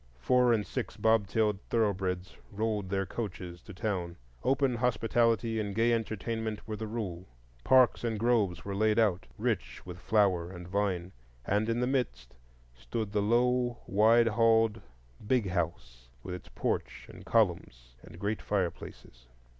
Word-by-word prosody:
Four 125 - +3
and 110 -3 +2
six - - -5
bobtailed 110 -2 +2
thoroughbreds 95 -5 -1 0.2
rolled 105 -2 -2
their 95 0 0
coaches 90 -4 -6
to - - -12
town; 95 -4 -3 0.3
open 135 +1 +2
hospitality 115 -2 +1
and 100 -2 -3
gay 115 +1 +3
entertainment 110 -1 -3
were 110 - -3
the 110 +1 -5
rule. 95 -5 -5 0.4
Parks 130 -2 +4
and 115 -2 -1
groves 105 -6 +1
were 100 - -3
laid 105 +2 +2
out, 105 -6 +2
rich - - -2
with 90 0 -8
flower 95 -5 +2
and 90 -2 -9
vine, 95 -2 -1 0.3
and 105 +3 +1
in 115 +1 0
the - - +2
midst 120 - -2 0.4
stood 105 - -4
the 105 0 +1
low 120 +2 +2
wide 115 +3 +4
halled 115 -1 +3 0.5
"big 120 -6 +2
house," 65 -9 -3 0.2
with 90 - -5
its 90 - -9
porch - - -3
and - - -12
columns 85 - 0
and - - -13
great 105 +2 -2
fireplaces. 85 -10 -4
105 Hz, 145 wpm, -30 LUFS, 90-115 Hz, 0.5 s, Parks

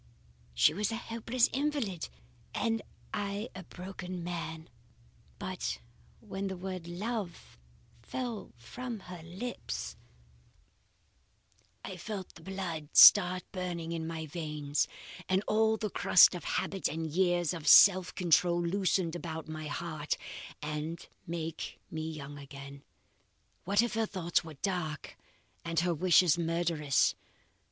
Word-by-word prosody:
"She - - +5
was 205 +3 -1
a - - -1
helpless 230 +2 0
invalid, 270 - -1 0.5
and 225 -1 0 0.3
I 205 +2 -2
a 190 - -7
broken 180 0 -7
man, 165 -2 -5 0.7
but 185 -1 -3 0.4
when 195 -2 -4
that 190 - -3
word 185 -2 -5
'love' 185 - -5 0.4
fell 240 - -5
from 235 - -6
her 180 -2 -9
lips, 185 +10 -5 1.9
I 185 - -6
felt 190 +1 -6
the 165 - -14
blood 170 -5 -5
start 185 -3 +9
burning 175 -3 -4
in 165 -1 -3
my 160 -1 -4
veins, 150 -2 -2 0.4
and 190 +1 +2
all 220 +1 +3
the 210 -2 -3
crust 190 - +7
of 175 - -6
habit 195 -1 -1
and 160 +2 -3
years 175 +1 +1
of 160 -3 -6
self 185 +2 +8
control 175 0 +3
loosen 180 0 +1
about 160 -2 -5
my 155 -1 -5
heart, 155 -1 -3 0.5
and 155 +2 -4 0.2
make 165 -1 -4
me 160 0 -3
young 145 -2 -7
again. 140 0 -10 0.8
What 200 +4 +4
if 240 - -1
her 225 0 +1
thoughts 175 -4 0
were 160 -2 -9
dark 160 -3 -3 0.5
and 165 -1 0
her 175 0 +1
wishes 175 0 +5
murderous! 165 -4 +2
175 Hz, 125 wpm, -31 LUFS, 160-195 Hz, 1.9 s, start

